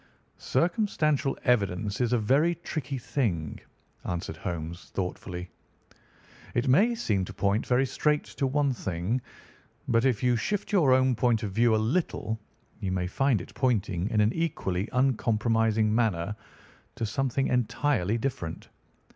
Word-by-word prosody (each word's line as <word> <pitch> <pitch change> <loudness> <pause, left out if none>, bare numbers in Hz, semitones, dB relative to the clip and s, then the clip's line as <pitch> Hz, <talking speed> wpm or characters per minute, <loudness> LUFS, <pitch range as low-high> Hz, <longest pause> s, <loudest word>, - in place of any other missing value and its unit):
"Circumstantial 160 - +1
evidence 105 -3 +1
is 120 -1 +1
a 125 - +4
very 140 +10 +3
tricky 150 -5 -4
thing," 100 - -2 0.4
answered 85 -2 -4
Holmes 85 0 -5
thoughtfully. 90 -1 -5 1.0
"It 120 +3 +1
may 210 - +4
seem 105 - 0
to 95 - -9
point 100 +3 0
very 125 +2 +3
straight 150 +3 +1
to 135 - -2
one 140 0 +1
thing, 95 +3 -2 0.7
but 115 -1 +3
if 125 -5 +1
you 125 -1 +3
shift 205 - -2
your 170 -10 +4
own 130 0 +4
point 120 -2 +1
of 100 - -2
view 115 +2 +3
a - - +3 0.2
little, 110 -10 -2 0.4
you 95 - -2
may 90 -1 -1
find 125 +3 +1
it - - -11
pointing 105 -7 0
in 105 -2 +2
an 105 +3 +3
equally 105 - -2
uncompromising 115 -3 +2
manner 105 -4 0 0.6
to 115 - -2
something 135 +4 0
entirely 125 -3 +1
different. 115 -10 -4
115 Hz, 140 wpm, -28 LUFS, 100-135 Hz, 1.0 s, a